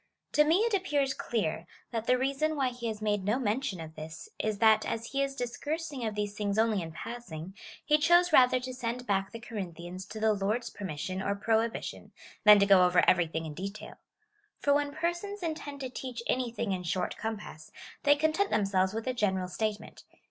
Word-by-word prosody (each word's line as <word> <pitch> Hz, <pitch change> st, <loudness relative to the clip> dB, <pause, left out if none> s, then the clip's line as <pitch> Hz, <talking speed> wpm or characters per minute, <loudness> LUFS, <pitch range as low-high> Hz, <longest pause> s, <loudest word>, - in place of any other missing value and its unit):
To 300 Hz, -, +5 dB
me 325 Hz, +6 st, +3 dB
it 460 Hz, 0 st, +1 dB
appears 290 Hz, -9 st, +1 dB
clear, 170 Hz, -10 st, -2 dB, 0.2 s
that 230 Hz, -1 st, -3 dB
the 250 Hz, -, +4 dB
reason 275 Hz, +4 st, 0 dB
why 270 Hz, -3 st, +1 dB
he 245 Hz, -1 st, -5 dB
has 215 Hz, -1 st, -4 dB
made 205 Hz, -2 st, +1 dB
no 210 Hz, +5 st, +1 dB
mention 220 Hz, -5 st, -1 dB
of 160 Hz, -1 st, -8 dB
this^ 155 Hz, 0 st, -9 dB
is, 215 Hz, -1 st, -1 dB
that 220 Hz, 0 st, +5 dB
as 230 Hz, 0 st, -3 dB
he 275 Hz, 0 st, 0 dB
is 275 Hz, 0 st, -1 dB
discoursing 280 Hz, +3 st, -4 dB
of 215 Hz, -, -4 dB
these 205 Hz, -1 st, -2 dB
things 205 Hz, -1 st, -1 dB
only 220 Hz, -3 st, +2 dB
in 165 Hz, -1 st, -6 dB
passing, 185 Hz, -3 st, -7 dB, 0.3 s
he 300 Hz, 0 st, +4 dB
chose 345 Hz, +2 st, +4 dB
rather 255 Hz, -1 st, +6 dB
to 255 Hz, 0 st, -5 dB
send 245 Hz, 0 st, -4 dB
back 195 Hz, -3 st, 0 dB
the 230 Hz, -, -7 dB
Corinthians 185 Hz, -5 st, -7 dB
to 220 Hz, -, -7 dB
the 220 Hz, 0 st, +3 dB
Lord's 210 Hz, +4 st, -1 dB
per 205 Hz, -, -7 dB
mission 185 Hz, +3 st, -4 dB
or 200 Hz, +1 st, 0 dB
prohibition, 225 Hz, +2 st, -1 dB, 0.3 s
than 210 Hz, 0 st, +10 dB
to 200 Hz, -, +4 dB
go 195 Hz, -2 st, +7 dB
over 180 Hz, 0 st, +4 dB
everything 165 Hz, -2 st, +2 dB
in 155 Hz, -, -6 dB
detail. 195 Hz, +6 st, -7 dB, 0.6 s
For 285 Hz, -, +2 dB
when 290 Hz, 0 st, +1 dB
persons 345 Hz, +6 st, -3 dB
intend 300 Hz, -4 st, -4 dB
to 260 Hz, -, -3 dB
teach 250 Hz, -2 st, -6 dB
anything 235 Hz, -4 st, -1 dB
in 185 Hz, -1 st, -1 dB
short 180 Hz, +1 st, -2 dB
com 220 Hz, -1 st, -3 dB
pass, 155 Hz, -6 st, -11 dB, 0.3 s
they 290 Hz, 0 st, +5 dB
content 315 Hz, +7 st, +1 dB
themselves 195 Hz, -1 st, +1 dB
with 225 Hz, -, -3 dB
a 255 Hz, -, 0 dB
general 190 Hz, -6 st, 0 dB
statement. 215 Hz, +2 st, -4 dB
225 Hz, 200 wpm, -30 LUFS, 195-270 Hz, 0.6 s, than